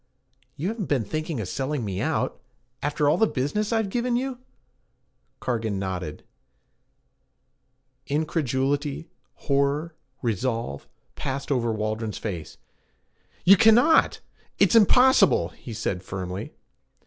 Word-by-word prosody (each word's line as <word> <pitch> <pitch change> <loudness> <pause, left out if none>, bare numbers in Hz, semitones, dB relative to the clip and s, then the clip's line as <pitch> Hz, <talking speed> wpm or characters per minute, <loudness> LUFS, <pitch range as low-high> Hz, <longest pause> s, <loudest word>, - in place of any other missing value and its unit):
'You 170 +7 -2
haven't 220 -4 -4
been 135 -5 +1
thinking 155 +3 -3
of 105 - -3
selling 135 +2 -2
me 95 -1 -3
out - - -1 0.4
after 145 0 0
all 145 - +3
the 220 - +5
business 205 - -1
I've 220 -4 0
given 240 +1 0
you?' 255 0 -2 1.0
Cargan 110 -4 -2
nodded. 90 -5 -4 1.8
Incredulity, 145 0 -1 0.2
horror, 140 +3 0 0.3
resolve, 115 - -2 0.3
passed 135 +2 -4
over 120 -4 +1
Waldron's 110 0 -3
face. 85 -8 -6 0.9
'You 195 +3 +9
cannot! 240 - +5 0.4
It's - - +4
impossible!' 225 - +5
he 115 - -11
said 95 -4 -3
firmly. 95 0 -6
140 Hz, 110 wpm, -25 LUFS, 110-180 Hz, 1.8 s, You